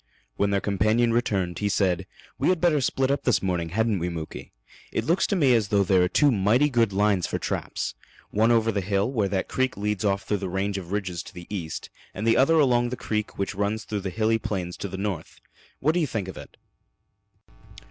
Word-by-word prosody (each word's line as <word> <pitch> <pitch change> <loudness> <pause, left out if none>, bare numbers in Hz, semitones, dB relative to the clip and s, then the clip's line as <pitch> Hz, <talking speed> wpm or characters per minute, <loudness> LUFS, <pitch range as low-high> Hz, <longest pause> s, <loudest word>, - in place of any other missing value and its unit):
When 100 - +1
their 100 -1 +2
companion 110 +4 +2
returned, 95 -7 0
he 105 - 0
said: 95 -2 +1 0.3
"We - - +2
had 185 -2 +2
better 160 -5 +3
split 130 +1 +1
up 140 - 0
this 125 - +1
morning, 90 -3 -1
hadn't 110 +2 +1
we, 85 +1 -1
Muky? 80 -2 -7 0.4
It - - -2
looks 170 +3 +2
to 200 - 0
me 140 -8 +4
as 110 -3 +2
though 100 0 +3
there 95 -1 +3
are 90 - +4
two 145 +6 +4
mighty 120 +7 +3
good 115 -4 +2
lines 100 -2 +2
for - - -2
traps - - -3 0.4
one 110 +2 +3
over 115 -1 +3
the 100 -2 -1
hill, 100 +4 0
where 110 -7 +1
that 95 -1 -1
creek 130 -4 -1
leads 105 -1 -1
off 100 -1 +1
through 105 - -1
the 95 -1 -4
range 95 +2 -1
of 90 -1 -10
ridges 95 -4 -2
to - - -12
the 90 -1 -9
east, 80 -4 -5 0.2
and 105 - -3
the 115 - +4
other 135 +5 +4
along 125 -5 +3
the 125 - -4
creek 105 -1 -3
which 100 +1 -2
runs 105 +2 -1
through 105 +1 -3
the 95 - -3
hilly 110 +3 +1
plains 95 -6 -3
to - - -4
the 95 0 -6
north. 95 -5 -4 0.4
What 150 - +3
do 175 - +1
you 160 - +1
think 110 -7 -3
of 95 - -7
it?" - - -11
105 Hz, 230 wpm, -25 LUFS, 95-120 Hz, 0.4 s, me